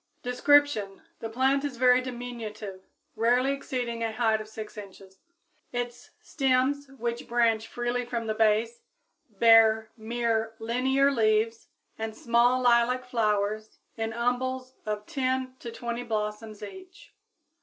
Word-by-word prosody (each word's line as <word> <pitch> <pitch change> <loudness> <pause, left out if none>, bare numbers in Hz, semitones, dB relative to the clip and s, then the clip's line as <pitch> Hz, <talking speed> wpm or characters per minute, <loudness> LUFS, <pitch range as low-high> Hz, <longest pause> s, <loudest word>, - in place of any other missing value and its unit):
Description. 250 -5 +2 0.2
The 225 - -5
plant 265 +4 +2
is 280 -4 -4
very 250 0 +5
diminutive, 230 -6 -7 0.3
rarely 245 +4 +2
exceeding 245 -4 -3
a 225 -1 -1
height 220 -1 +1
of 215 - -9
6 220 -1 -8
inches. 195 -2 -12 0.5
Its 245 0 -5
stems, 270 +1 0
which 235 0 -3
branch 230 -2 +2
freely 240 +1 -2
from 235 -1 -4
the 220 - -1
base, 220 +2 +1 0.5
bear 220 0 +5
mere 225 -1 -1
linear 260 +5 +2
leaves 225 -1 +1 0.3
and 220 -1 -4
small 240 +2 +3
lilac 245 +1 +3
flowers, 215 -2 -1 0.2
in 225 -1 -2
little 235 +1 -4
umbels 255 +1 -1
of 210 0 -3
10 260 0 -2
to 235 - -7
20 235 +1 -4
blossoms 215 -1 -4
each. 370 - -12
235 Hz, 130 wpm, -27 LUFS, 220-255 Hz, 0.5 s, very